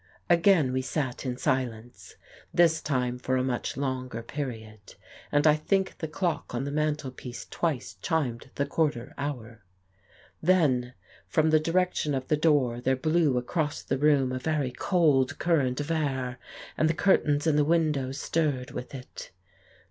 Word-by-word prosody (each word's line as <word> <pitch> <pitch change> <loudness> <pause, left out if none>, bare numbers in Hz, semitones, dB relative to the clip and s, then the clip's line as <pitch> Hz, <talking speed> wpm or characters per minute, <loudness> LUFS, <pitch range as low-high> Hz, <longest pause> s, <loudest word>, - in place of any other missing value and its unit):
Again 170 -6 +4
we 130 - +1
sat 130 0 -3
in 125 -1 -3
silence, 120 -4 -3 0.4
this 165 -2 +4
time 125 -3 -1
for 130 +1 0
a 130 - +1
much 125 -2 -2
longer 130 -4 -3
period, 110 -6 -7 0.4
and 145 0 +2
I 155 -1 +6
think 190 +5 -1
the 160 - -3
clock 155 -3 -2
on 120 - -1
the 140 - -3
mantel 150 -2 -1
piece 125 -1 -8
twice 155 -7 -2
chimed 135 -7 -1
the 140 - 0
quarter 145 -3 -1
hour. 120 -6 -5 0.8
Then 140 -8 +2 0.3
from 155 0 +2
the 155 - +5
direction 165 -2 0
of 130 -1 -4
the 155 - +4
door 145 -6 +2
there 130 +1 +2
blew 155 0 +2
across 150 +4 -2
the - - -2
room 140 -3 +3
a 130 - -2
very 145 -2 -1
cold 145 -3 +2
current 145 -7 +1
of 145 +2 -3
air, 130 -5 -1 0.4
and 155 - +3
the 165 - 0
curtains 150 -6 +2
in 160 -2 +3
the 150 - +4
win 160 0 +3
dow 135 -3 -2
stirred 140 -2 -1
with 125 +2 -7
it. 125 -1 -9
140 Hz, 165 wpm, -27 LUFS, 125-155 Hz, 0.8 s, I